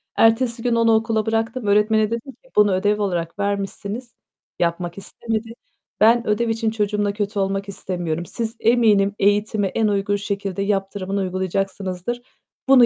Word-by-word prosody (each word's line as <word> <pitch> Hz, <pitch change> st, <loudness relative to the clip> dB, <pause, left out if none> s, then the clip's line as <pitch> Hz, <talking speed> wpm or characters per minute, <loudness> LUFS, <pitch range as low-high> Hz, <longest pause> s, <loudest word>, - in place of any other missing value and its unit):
Ertesi 230 Hz, +1 st, +3 dB
gün 240 Hz, -1 st, +2 dB
onu 230 Hz, -1 st, +4 dB
okula 220 Hz, -1 st, +1 dB
bıraktım. 225 Hz, +1 st, -1 dB
Öğretmene 215 Hz, +1 st, +3 dB
dedim 235 Hz, +4 st, -4 dB
ki. 260 Hz, +2 st, -25 dB
"Bunu 210 Hz, -1 st, +5 dB
ödev 205 Hz, +3 st, +1 dB
olarak 175 Hz, -1 st, -2 dB
vermişsiniz, 200 Hz, +4 st, -3 dB, 0.5 s
yapmak 175 Hz, +1 st, -1 dB
istemedi. 225 Hz, +2 st, -4 dB, 0.5 s
Ben 230 Hz, +2 st, +5 dB
ödev 225 Hz, +2 st, +1 dB
için 225 Hz, 0 st, 0 dB
çocuğumla 205 Hz, -1 st, 0 dB
kötü 205 Hz, 0 st, -2 dB
olmak 195 Hz, +1 st, -1 dB
istemiyorum. 175 Hz, -3 st, -3 dB
Siz 230 Hz, +4 st, -4 dB
eminim 210 Hz, -4 st, +3 dB
eğitimi, 205 Hz, 0 st, +2 dB
en 220 Hz, +2 st, +1 dB
uygun 200 Hz, 0 st, +1 dB
şekilde 200 Hz, -1 st, -3 dB
yaptırımını 195 Hz, -1 st, -1 dB
uygulayacaksınızdır. 190 Hz, +3 st, -2 dB, 0.5 s
Bunu 255 Hz, -3 st, +8 dB
205 Hz, 140 wpm, -22 LUFS, 195-225 Hz, 0.5 s, Bunu